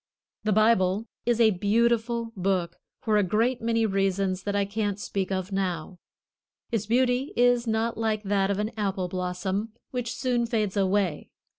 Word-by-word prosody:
The 215 - +2
Bible 215 -1 +3 0.2
is 240 -1 +2
a 225 -2 +6
beautiful 230 +3 +1
book 185 -2 -1 0.2
for 215 -2 +2
a 205 - +4
great 225 +7 +1
many 230 0 +1
reasons 195 -2 0
that 205 0 -1
I 200 -1 +2
can't 205 0 -2
speak 195 -2 -3
of 185 0 -2
now. 180 -2 -3 0.7
Its 220 -3 -1
beauty 250 +3 +1
is 245 0 +3
not 225 +1 0
like 220 -1 0
that 195 -1 +1
of 200 - 0
an 210 +2 -1
apple 195 -3 -1
blossom, 185 +4 -3 0.2
which 245 -1 -3
soon 245 -3 0
fades 215 -4 -1
away. 195 -4 0
210 Hz, 160 wpm, -26 LUFS, 190-230 Hz, 0.7 s, a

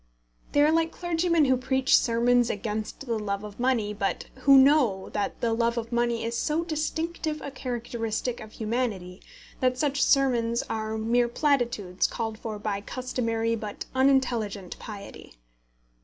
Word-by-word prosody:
They 290 - +4
are 300 - +4
like 325 0 +2
clergymen 335 -2 +1
who 260 -1 +4
preach 265 +1 +2
sermons 240 0 +3
against 215 +1 -4
the 230 -3 -1
love 200 -1 -3
of 210 +1 -9
money, 240 -5 +1
but 200 -1 -2
who 275 +1 +6
know 265 -8 +4
that 205 - -3
the 230 -1 +1
love 235 +1 +1
of 230 0 -4
money 235 -1 0
is 230 +1 -2
so 305 +6 0
distinctive 320 0 -2
a 280 - -6
characteristic 240 -2 -3
of 215 0 -11
humanity 215 -6 -3 0.4
that 255 -1 +1
such 280 0 0
sermons 240 -4 +2
are 220 0 -3
mere 235 +2 +2
platitudes 235 - 0
called 220 -1 -4
for 220 -2 -5
by 205 -1 -3
customary 230 -1 -2
but 210 -2 -6
unintelligent 245 -8 +1
piety. 200 - -10
235 Hz, 150 wpm, -27 LUFS, 220-265 Hz, 0.4 s, who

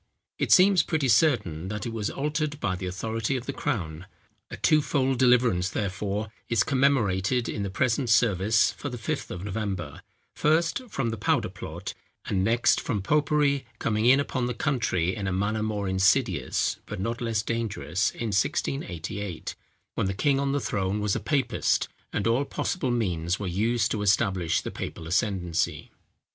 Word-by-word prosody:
It - - 0
seems 190 -1 +7
pretty 155 -5 0
certain 105 - +2
that 105 +4 -4
it 115 - -4
was 110 -3 -2
altered 150 +1 -2
by 95 -8 -1
the 90 0 -5
authority 110 +6 -2
of 125 - -6
the 140 - -3
crown. 90 - -3 0.4
A - - -7
twofold 135 -4 +2
deliverance, 120 -8 +4
therefore, 100 +1 -3 0.2
is 115 -3 +3
commemorated 125 -5 +2
in 105 - -3
the 100 - -2
present 120 +5 0
service 110 -1 +3
for 145 - -6
the 125 - -6
Fifth 110 - -3
of 90 - -6
November; 95 -7 -4 0.3
first, 165 - +2
from 130 - -1
the 115 - -5
powder - - +1
plot, - - -7 0.3
and 95 -2 0
next, 115 +4 +3
from 105 -5 -2
popery 145 0 +2
coming 110 +1 0
in 135 +2 +7
upon 130 -3 -1
the 125 - -3
country 115 - 0
in 100 -3 -3
a - - 0
manner 100 +4 0
more 105 -2 -2
insidious, 95 +3 +2
but - - -5
not 115 +6 -3
less 115 -3 0
dangerous 110 -7 -1
in 115 - -4
1688, 100 - -2 0.4
when - - -1
the 95 - -2
king 135 +6 +2
on 140 0 0
the 145 - +1
throne 100 -4 -1
was 105 -2 0
a - - 0
papist, 135 -5 +1 0.2
and 105 - -2
all 115 +4 +2
possible 140 0 -2
means 90 -7 0
were 105 - -4
used 110 +5 +1
to 105 - -1
establish 95 -4 +2
the - - -5
papal 80 - -6
ascendancy. 90 -3 -1
110 Hz, 170 wpm, -26 LUFS, 95-130 Hz, 0.4 s, seems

